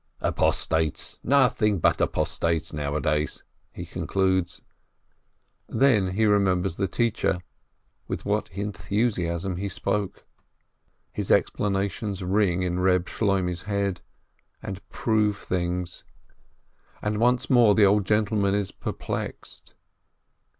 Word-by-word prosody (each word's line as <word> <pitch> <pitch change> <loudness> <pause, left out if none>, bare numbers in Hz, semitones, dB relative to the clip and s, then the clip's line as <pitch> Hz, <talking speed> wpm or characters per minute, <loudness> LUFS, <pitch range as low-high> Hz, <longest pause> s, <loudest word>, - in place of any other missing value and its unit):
"Apostates, 80 -2 0
nothing 120 -6 +3
but - - +2
apostates 80 -1 0
nowadays," 75 +1 -1 0.3
he - - -7
concludes. 95 -2 -1 1.1
Then 105 -9 +3
he 110 +3 +2
remembers 95 -3 +2
the 100 - 0
teacher 105 -4 0 0.3
— - - -45
with - - -4
what - - 0
enthusiasm 95 -1 -2
he 100 +2 -3
spoke! 100 0 -2 0.9
His - - -4
explanations 100 0 0
ring 95 -1 +1
in 90 0 -1
Reb 90 -1 +3
Shloimeh's 95 -5 -1
head, 100 -3 -1 0.6
and 95 0 -6
prove 105 -3 +1
things, 90 -1 -3 1.0
and 105 0 -1
once 125 +1 +2
more 120 -5 +5
the 105 - +6
old 100 0 +3
gentleman 105 -1 +2
is 100 -2 +1
perplexed. - - -6
95 Hz, 105 wpm, -25 LUFS, 90-105 Hz, 1.1 s, the